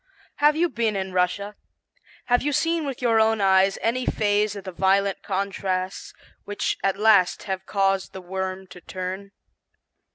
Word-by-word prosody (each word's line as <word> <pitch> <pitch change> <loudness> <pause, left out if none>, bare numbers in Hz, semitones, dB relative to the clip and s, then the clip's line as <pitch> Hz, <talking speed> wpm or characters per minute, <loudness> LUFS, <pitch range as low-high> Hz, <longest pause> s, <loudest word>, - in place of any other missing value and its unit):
Have 295 +1 +4
you 340 +2 +2
been 230 -6 -1
in 190 -1 -3
Russia? 185 +3 -1 0.7
Have 245 0 +2
you 290 +1 -1
seen 330 +1 0
with 260 -2 -6
your 230 -2 +3
own 220 0 +3
eyes 195 0 +3
any 250 +2 0
phase 210 0 +1
of 200 - -7
the 190 - -6
violent 195 +2 +1
contrasts 190 -1 -3 0.3
which 205 -1 -2
at 195 0 +1
last 205 -4 +3
have 190 -1 -5
caused 195 -1 0
the 190 - -8
worm 190 +1 -4
to 180 - -12
turn? 185 +2 -6
200 Hz, 160 wpm, -24 LUFS, 190-220 Hz, 0.7 s, Have